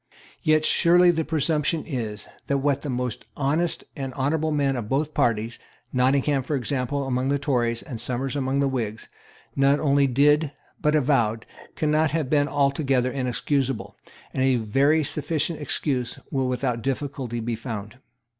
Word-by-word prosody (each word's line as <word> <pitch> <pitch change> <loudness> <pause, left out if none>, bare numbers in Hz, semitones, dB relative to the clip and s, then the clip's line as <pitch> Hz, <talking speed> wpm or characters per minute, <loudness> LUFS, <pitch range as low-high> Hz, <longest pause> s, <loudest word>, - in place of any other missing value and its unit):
Yet 155 0 +3
surely 175 +2 +5
the 165 -1 -1
presumption 155 0 0
is 110 - -4 0.2
that 140 - +1
what 140 0 0
the 145 - -5
most 125 -2 -3
honest 155 +4 0
and 135 -3 -5
honourable 150 +3 0
men 140 -2 +1
of 115 -4 -4
both 150 +3 0
parties, 115 0 0 0.3
Nottingham, 135 +2 +2
for 145 +3 -2
example, 135 +1 -2
among 130 0 0
the 140 - +2
Tories, 120 -5 0
and 120 -7 -5
Somers 125 +2 -2
among 135 0 0
the 140 - +2
Whigs, 115 -5 -3 0.5
not 140 +1 +3
only 140 -1 +3
did, 145 +3 +3 0.3
but 150 0 +2
avowed, 120 -6 +1 0.3
cannot 155 0 +2
have 155 -3 -2
been 145 -1 +3
altogether 135 -2 +1
inexcusable; 125 -4 -1 0.4
and 130 - -1
a 130 -1 +4
very 135 +8 +2
sufficient 155 +2 -1
excuse 130 -3 -1
will 135 -1 0
without 125 -2 -1
difficulty 135 -2 -3
be 115 +1 -2
found. 110 0 -7
135 Hz, 155 wpm, -24 LUFS, 125-150 Hz, 0.5 s, surely